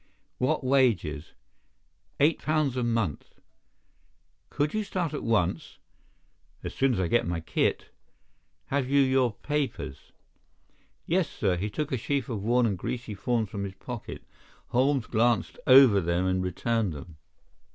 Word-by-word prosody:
"What 150 Hz, +3 st, +1 dB
wages?" 115 Hz, -, +1 dB, 0.9 s
"Eight 150 Hz, +3 st, +3 dB
pounds 155 Hz, -4 st, 0 dB
a 125 Hz, -, -1 dB
month." 115 Hz, -, -2 dB, 1.1 s
"Could 145 Hz, +1 st, -1 dB
you 215 Hz, -, 0 dB
start 180 Hz, -6 st, -3 dB
at 150 Hz, -, -3 dB
once?" 105 Hz, -7 st, -1 dB, 0.9 s
"As -, -, -5 dB
soon 135 Hz, -2 st, +2 dB
as -, -, -2 dB
I 90 Hz, -, +1 dB
get 120 Hz, -1 st, +1 dB
my 85 Hz, -1 st, -1 dB
kit." 80 Hz, -1 st, -1 dB, 0.8 s
"Have 135 Hz, -2 st, 0 dB
you 140 Hz, +1 st, +4 dB
your 130 Hz, -2 st, +3 dB
papers?" 145 Hz, -, -3 dB, 0.9 s
"Yes, 175 Hz, -1 st, +1 dB
sir." 95 Hz, -4 st, 0 dB
He 100 Hz, +4 st, -3 dB
took 150 Hz, +8 st, -3 dB
a 130 Hz, -, 0 dB
sheaf 130 Hz, +2 st, -2 dB
of 110 Hz, -5 st, -3 dB
worn 120 Hz, +3 st, +2 dB
and 100 Hz, -5 st, -1 dB
greasy 120 Hz, 0 st, -4 dB
forms 110 Hz, +2 st, -1 dB
from 100 Hz, -, -4 dB
his 95 Hz, -1 st, -6 dB
pocket. 120 Hz, +3 st, -8 dB, 0.5 s
Holmes 130 Hz, 0 st, +2 dB
glanced 120 Hz, +1 st, +1 dB
over 130 Hz, -6 st, +8 dB
them 85 Hz, +1 st, 0 dB
and 95 Hz, 0 st, +1 dB
returned 100 Hz, +2 st, -1 dB
them. 75 Hz, +2 st, -10 dB
120 Hz, 145 wpm, -27 LUFS, 95-135 Hz, 1.1 s, over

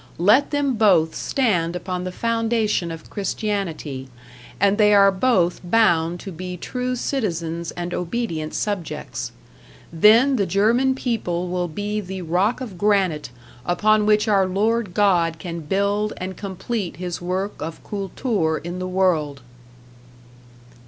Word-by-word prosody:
Let 210 Hz, +11 st, +4 dB
them 285 Hz, -4 st, 0 dB
both 180 Hz, -7 st, +4 dB
stand 180 Hz, -10 st, 0 dB
upon 180 Hz, 0 st, -4 dB
the 185 Hz, -, -3 dB
foundation 225 Hz, -3 st, 0 dB
of 165 Hz, -1 st, -9 dB
Christianity, 190 Hz, -10 st, -3 dB, 0.5 s
and 200 Hz, +2 st, +3 dB
they 210 Hz, -1 st, +6 dB
are 200 Hz, -1 st, +6 dB
both 185 Hz, -4 st, +1 dB
bound 175 Hz, -4 st, +2 dB
to 195 Hz, -, -7 dB
be 180 Hz, +1 st, -6 dB
true 250 Hz, +6 st, -3 dB
citizens 170 Hz, -, -2 dB
and 175 Hz, 0 st, -5 dB
obedient 170 Hz, -5 st, -3 dB
subjects. 175 Hz, -, -3 dB, 0.6 s
Then 230 Hz, -, +5 dB
the 200 Hz, -3 st, +1 dB
German 235 Hz, +7 st, +2 dB
people 180 Hz, -9 st, -2 dB
will 180 Hz, 0 st, -1 dB
be 205 Hz, +6 st, -3 dB
the 190 Hz, -1 st, -6 dB
rock 185 Hz, +9 st, +1 dB
of 205 Hz, -9 st, -7 dB
granite 190 Hz, -9 st, +1 dB, 0.3 s
upon 210 Hz, +6 st, +2 dB
which 210 Hz, +1 st, +3 dB
our 195 Hz, -3 st, +3 dB
Lord 210 Hz, +1 st, 0 dB
God 175 Hz, -5 st, +3 dB
can 170 Hz, -1 st, -6 dB
build 200 Hz, +6 st, 0 dB
and 185 Hz, +1 st, -5 dB
complete 200 Hz, -1 st, -4 dB
his 180 Hz, -1 st, -5 dB
work 185 Hz, +3 st, -3 dB
of 160 Hz, +1 st, -6 dB
Kultur 195 Hz, -4 st, -1 dB
in 175 Hz, +2 st, -6 dB
the 185 Hz, -, -3 dB
world. 170 Hz, -7 st, 0 dB
190 Hz, 135 wpm, -22 LUFS, 175-215 Hz, 0.6 s, they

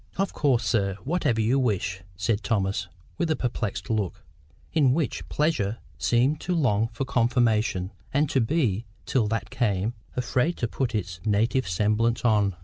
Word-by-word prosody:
"Of 195 Hz, 0 st, 0 dB
course, 135 Hz, -6 st, +2 dB
sir, 100 Hz, -5 st, +1 dB
whatever 135 Hz, -8 st, +1 dB
you 120 Hz, +5 st, +2 dB
wish," 100 Hz, -6 st, 0 dB, 0.2 s
said 100 Hz, +3 st, 0 dB
Thomas, 100 Hz, -4 st, 0 dB, 0.3 s
with 170 Hz, -2 st, +1 dB
a 155 Hz, -, +2 dB
perplexed 120 Hz, -6 st, -3 dB
look, 105 Hz, -6 st, -2 dB, 0.5 s
in 135 Hz, -5 st, +4 dB
which 155 Hz, 0 st, -2 dB
pleasure 130 Hz, -9 st, 0 dB, 0.2 s
seemed 130 Hz, +6 st, +2 dB
to 180 Hz, -, -1 dB
long 115 Hz, -9 st, +2 dB
for 135 Hz, -, -3 dB
confirmation, 115 Hz, -7 st, +1 dB, 0.2 s
and 145 Hz, +3 st, +2 dB
to 135 Hz, -, +3 dB
be, 115 Hz, -, +1 dB, 0.2 s
till 120 Hz, -5 st, +1 dB
that 110 Hz, -1 st, -2 dB
came, 110 Hz, -4 st, 0 dB, 0.2 s
afraid 130 Hz, +6 st, 0 dB
to 120 Hz, -, -1 dB
put 120 Hz, 0 st, -2 dB
its 85 Hz, -5 st, -3 dB
"native 110 Hz, +5 st, +1 dB
semblance 110 Hz, +6 st, +1 dB
on." 105 Hz, -4 st, +3 dB
115 Hz, 155 wpm, -26 LUFS, 105-135 Hz, 0.5 s, in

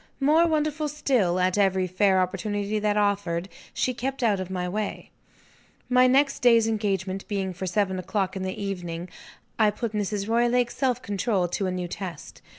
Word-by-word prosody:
More 310 Hz, +5 st, +4 dB
wonderful 305 Hz, -1 st, 0 dB
still, 255 Hz, -12 st, +1 dB
at 185 Hz, +2 st, +1 dB
every 190 Hz, -2 st, +2 dB
fair 190 Hz, +1 st, +2 dB
opportunity 205 Hz, +3 st, -2 dB
that 210 Hz, 0 st, +1 dB
offered, 195 Hz, -4 st, 0 dB, 0.2 s
she 255 Hz, -, -1 dB
kept 260 Hz, +2 st, -3 dB
out 210 Hz, -4 st, +2 dB
of 185 Hz, -1 st, -5 dB
my 180 Hz, -1 st, -2 dB
way. 210 Hz, +3 st, -4 dB, 0.8 s
My 255 Hz, 0 st, +5 dB
next 275 Hz, +2 st, +3 dB
day's 230 Hz, -2 st, +5 dB
engagement 195 Hz, -3 st, -2 dB
being 195 Hz, -2 st, -2 dB
for 185 Hz, +2 st, -5 dB
seven 190 Hz, 0 st, 0 dB
o'clock 190 Hz, +1 st, -2 dB
in 190 Hz, -, -4 dB
the 185 Hz, 0 st, -4 dB
evening, 180 Hz, -3 st, -4 dB, 0.5 s
I 215 Hz, -1 st, +5 dB
put 220 Hz, +2 st, -3 dB
Mrs. 205 Hz, -1 st, -2 dB
Roylake's 240 Hz, +1 st, +2 dB
self 250 Hz, -2 st, 0 dB
control 200 Hz, -2 st, 0 dB
to 190 Hz, +2 st, -1 dB
a -, -, -1 dB
new 180 Hz, -1 st, -3 dB
test. 175 Hz, -3 st, -7 dB
205 Hz, 170 wpm, -26 LUFS, 185-240 Hz, 0.8 s, My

